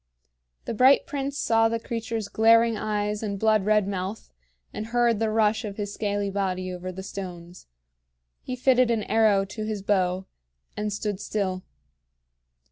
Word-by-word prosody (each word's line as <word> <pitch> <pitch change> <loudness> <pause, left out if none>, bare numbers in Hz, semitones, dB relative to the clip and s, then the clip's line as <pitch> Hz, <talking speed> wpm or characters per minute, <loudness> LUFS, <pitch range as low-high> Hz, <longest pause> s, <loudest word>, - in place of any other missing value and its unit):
The - - -3
bright 255 +5 +5
prince 280 0 -4
saw 225 -3 +3
the 230 0 -1
creature's 225 -2 -4
glaring 230 +1 +4
eyes 210 -1 -2
and 205 -2 -3
blood 215 -1 +2
red 210 -2 +3
mouth, 195 +2 -5 0.4
and 215 - -5
heard 235 -2 +2
the 225 -1 +1
rush 220 +1 +2
of 205 -2 -6
his 205 -1 -4
scaly 205 -1 -2
body 185 -2 -2
over 180 +1 -6
the 190 +1 -8
stones. 180 -3 -8 0.7
He 255 - -5
fitted 255 -1 +3
an 225 -3 +1
arrow 210 -3 +3
to 215 +2 -6
his 215 -2 -4
bow, 185 -2 +1 0.5
and 210 0 -2
stood 205 -1 -3
still. 190 -3 -2
210 Hz, 155 wpm, -25 LUFS, 195-225 Hz, 0.7 s, bright